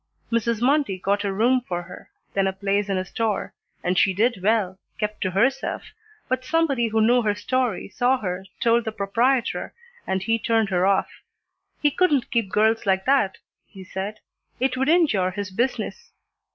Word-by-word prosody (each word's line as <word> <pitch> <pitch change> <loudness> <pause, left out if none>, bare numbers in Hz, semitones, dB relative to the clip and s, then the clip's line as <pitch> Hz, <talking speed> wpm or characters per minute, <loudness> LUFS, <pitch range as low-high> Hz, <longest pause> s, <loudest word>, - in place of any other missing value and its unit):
Mrs. 230 0 0
Mundy 275 -7 +2
got 200 +2 0
a 200 - -1
room 240 +6 +2
for 175 -1 -3
her, 180 - -12 0.2
then 195 -1 +2
a 190 - -1
place 200 +1 -1
in 195 - 0
a 185 - -2
store, 220 +1 -2 0.3
and 180 +1 +1
she 190 -2 +3
did 225 0 +1
well, 195 -2 +1 0.2
kept 210 0 -3
to 185 - 0
herself, 260 +9 0 0.4
but 255 0 -1
somebody 290 -5 +1
who 220 0 +1
knew 245 +2 +4
her 210 -2 0
story 250 0 -1
saw 250 +5 +1
her, 185 -5 -4 0.2
told 235 0 +3
the 220 - -2
proprietor, 230 +6 0 0.3
and 190 0 -1
he 225 +3 +1
turned 225 -2 +1
her 185 0 +2
off. 195 -1 +2 0.7
He 295 - +4
couldn't 295 -6 +1
keep 230 -5 0
girls 220 +2 +2
like 190 0 +2
that, 260 -9 +2 0.3
he 190 -3 -12
said. 195 +3 -5 0.4
It 260 0 +1
would 265 +2 0
injure 295 - +3
his 190 +1 -5
business. 260 - -2
215 Hz, 180 wpm, -24 LUFS, 195-250 Hz, 0.7 s, knew